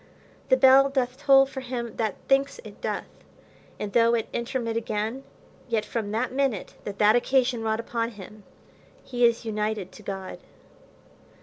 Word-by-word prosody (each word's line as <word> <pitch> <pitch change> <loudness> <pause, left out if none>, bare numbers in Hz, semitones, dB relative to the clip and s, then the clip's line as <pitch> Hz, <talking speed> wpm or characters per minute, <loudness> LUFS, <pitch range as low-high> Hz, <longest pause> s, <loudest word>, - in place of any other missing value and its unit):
The 260 - +5
bell 265 +1 +7
doth 255 -2 -1
toll 270 0 +5
for 265 0 -7
him 245 -2 -5
that 220 -4 -1
thinks 275 - +2
it - - -12
doth; - - -2 0.7
and 205 -1 -4
though 235 0 +4
it 225 - -2
intermit 235 -1 -2
again, 225 +3 -2 0.5
yet 225 -2 0
from 220 -3 -3
that 225 +4 -1
minute 265 -6 -1
that 200 -1 -5
that 210 +1 +5
occasion 250 -1 +2
wrought 220 0 -1
upon 230 0 -2
him, 210 +2 -11 0.6
he 245 -1 -2
is 235 0 +3
united 210 -3 -2
to 200 - -13
God. 190 -2 -6
235 Hz, 160 wpm, -26 LUFS, 215-260 Hz, 0.7 s, bell